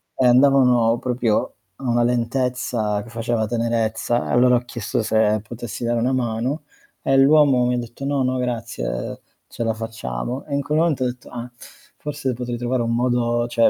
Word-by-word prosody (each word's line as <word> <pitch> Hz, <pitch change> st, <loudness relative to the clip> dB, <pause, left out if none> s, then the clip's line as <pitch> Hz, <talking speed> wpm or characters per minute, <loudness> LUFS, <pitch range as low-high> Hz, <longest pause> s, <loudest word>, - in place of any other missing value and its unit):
e 130 Hz, -, +1 dB
andavano 125 Hz, -3 st, +5 dB
proprio 120 Hz, -3 st, 0 dB, 0.2 s
a 135 Hz, -, -6 dB
una 120 Hz, 0 st, +3 dB
lentezza 120 Hz, -3 st, 0 dB
che 115 Hz, -, -13 dB
faceva 115 Hz, -1 st, -1 dB
tenerezza, 115 Hz, 0 st, 0 dB
e -, -, -1 dB
allora 125 Hz, +1 st, +5 dB
ho -, -, +3 dB
chiesto 120 Hz, 0 st, -3 dB
se 110 Hz, -1 st, +2 dB
potessi 120 Hz, -1 st, -6 dB
dare 120 Hz, 0 st, +1 dB
una 125 Hz, +3 st, +1 dB
mano, 125 Hz, +4 st, -1 dB, 0.4 s
e 135 Hz, -, +2 dB
l'uomo 135 Hz, -2 st, +5 dB
mi 125 Hz, -, +1 dB
ha -, -, -1 dB
detto:" 120 Hz, +3 st, -6 dB
No 140 Hz, -1 st, +1 dB
no 130 Hz, 0 st, 0 dB
grazie 115 Hz, -, -3 dB, 0.3 s
ce -, -, -5 dB
la 115 Hz, -1 st, +1 dB
facciamo", 110 Hz, -, -5 dB
e 140 Hz, -, -2 dB
in 140 Hz, -, +1 dB
quel 150 Hz, +3 st, 0 dB
momento 160 Hz, -6 st, +2 dB
ho -, -, +2 dB
detto:" 125 Hz, 0 st, -7 dB
Ah, 120 Hz, 0 st, -6 dB, 0.5 s
forse 145 Hz, -3 st, -3 dB
potrei 120 Hz, 0 st, -4 dB
trovare 120 Hz, +1 st, -1 dB
un 115 Hz, 0 st, -1 dB
modo", 120 Hz, -1 st, +1 dB
cioè 115 Hz, -1 st, +4 dB
120 Hz, 185 wpm, -22 LUFS, 115-130 Hz, 0.5 s, andavano